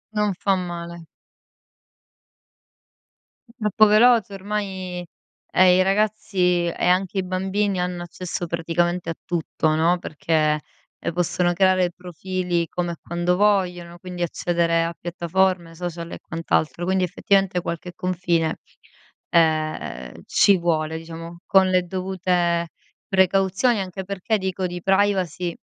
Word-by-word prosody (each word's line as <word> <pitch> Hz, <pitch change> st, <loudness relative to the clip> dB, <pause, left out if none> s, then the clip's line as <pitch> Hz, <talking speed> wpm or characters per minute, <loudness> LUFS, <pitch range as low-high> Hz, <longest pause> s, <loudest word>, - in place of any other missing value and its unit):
Non 210 Hz, -1 st, +2 dB
fa 195 Hz, -1 st, +2 dB
male. 170 Hz, -2 st, -6 dB, 2.4 s
Troppo 215 Hz, -2 st, +3 dB
veloce 215 Hz, -1 st, +5 dB
ormai 190 Hz, -3 st, -4 dB, 0.5 s
e 185 Hz, -1 st, +6 dB
i 185 Hz, -, +5 dB
ragazzi 195 Hz, -3 st, +1 dB
e 170 Hz, -, -2 dB
anche 185 Hz, +2 st, +2 dB
i -, -, 0 dB
bambini 190 Hz, +1 st, -1 dB
hanno 180 Hz, -1 st, -2 dB
accesso 175 Hz, 0 st, -5 dB
praticamente 170 Hz, +1 st, -1 dB
a 165 Hz, -, -3 dB
tutto, 160 Hz, -2 st, 0 dB
no, 170 Hz, +3 st, +2 dB
perché, 155 Hz, -1 st, 0 dB, 0.4 s
ehm, -, -, -3 dB
possono 175 Hz, +1 st, +1 dB
creare 185 Hz, -1 st, +3 dB
profili 180 Hz, 0 st, -3 dB
come 175 Hz, -1 st, -2 dB
e -, -, -8 dB
quando 175 Hz, +1 st, 0 dB
vogliono, 180 Hz, -4 st, +1 dB
quindi 180 Hz, -1 st, -7 dB
accedere 170 Hz, 0 st, +1 dB
a 170 Hz, -, -2 dB
piattaforme, 175 Hz, 0 st, -1 dB
social 170 Hz, -1 st, -5 dB
e -, -, -7 dB
quant'altro. 165 Hz, +1 st, -1 dB
Quindi, 190 Hz, 0 st, +1 dB
effettivamente 185 Hz, 0 st, +1 dB
qualche 170 Hz, +1 st, -5 dB
confine, 175 Hz, -2 st, -1 dB, 0.7 s
ehm, 155 Hz, -, 0 dB
ci 200 Hz, -2 st, +4 dB
vuole, 160 Hz, -2 st, 0 dB
diciamo. 165 Hz, +1 st, -9 dB
Con 190 Hz, -1 st, +5 dB
le 185 Hz, -1 st, +3 dB
dovute 180 Hz, -2 st, -1 dB, 0.4 s
precauzioni, 195 Hz, +4 st, +2 dB
anche 190 Hz, 0 st, -5 dB
perché, 200 Hz, +3 st, -1 dB
dico, 190 Hz, -1 st, -2 dB
di 175 Hz, -1 st, -6 dB
privacy 190 Hz, -3 st, +1 dB
180 Hz, 120 wpm, -23 LUFS, 170-190 Hz, 2.4 s, e